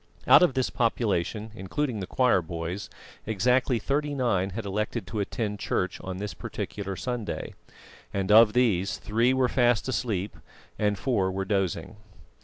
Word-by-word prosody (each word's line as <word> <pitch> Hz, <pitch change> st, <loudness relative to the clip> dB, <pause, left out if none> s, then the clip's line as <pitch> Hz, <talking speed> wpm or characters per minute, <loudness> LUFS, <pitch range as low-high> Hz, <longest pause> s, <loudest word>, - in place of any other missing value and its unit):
Out -, -, +8 dB
of 175 Hz, -8 st, +3 dB
this 130 Hz, -1 st, 0 dB
population, 110 Hz, -2 st, 0 dB
including 110 Hz, +4 st, -3 dB
the 95 Hz, -, -5 dB
choir 125 Hz, -7 st, +3 dB
boys, 85 Hz, +4 st, -5 dB, 0.4 s
exactly 125 Hz, +4 st, +2 dB
thirty 145 Hz, +5 st, -1 dB
nine 100 Hz, -8 st, +1 dB
had 105 Hz, +3 st, -5 dB
elected 105 Hz, +2 st, -2 dB
to 110 Hz, -, -4 dB
attend 105 Hz, 0 st, -2 dB
church 90 Hz, -1 st, -2 dB
on 95 Hz, -1 st, -5 dB
this 100 Hz, -1 st, -4 dB
particular 100 Hz, +3 st, -5 dB
Sunday; 120 Hz, 0 st, -4 dB, 0.6 s
and 100 Hz, 0 st, -1 dB
of 110 Hz, 0 st, +7 dB
these, 100 Hz, -7 st, +2 dB
three 115 Hz, +4 st, +1 dB
were 130 Hz, -1 st, +2 dB
fast 120 Hz, -2 st, +2 dB
asleep 105 Hz, -6 st, -2 dB, 0.4 s
and 105 Hz, -1 st, +1 dB
four 100 Hz, -3 st, +1 dB
were 95 Hz, +1 st, -3 dB
dozing. 95 Hz, +1 st, -1 dB
105 Hz, 150 wpm, -27 LUFS, 95-125 Hz, 0.6 s, Out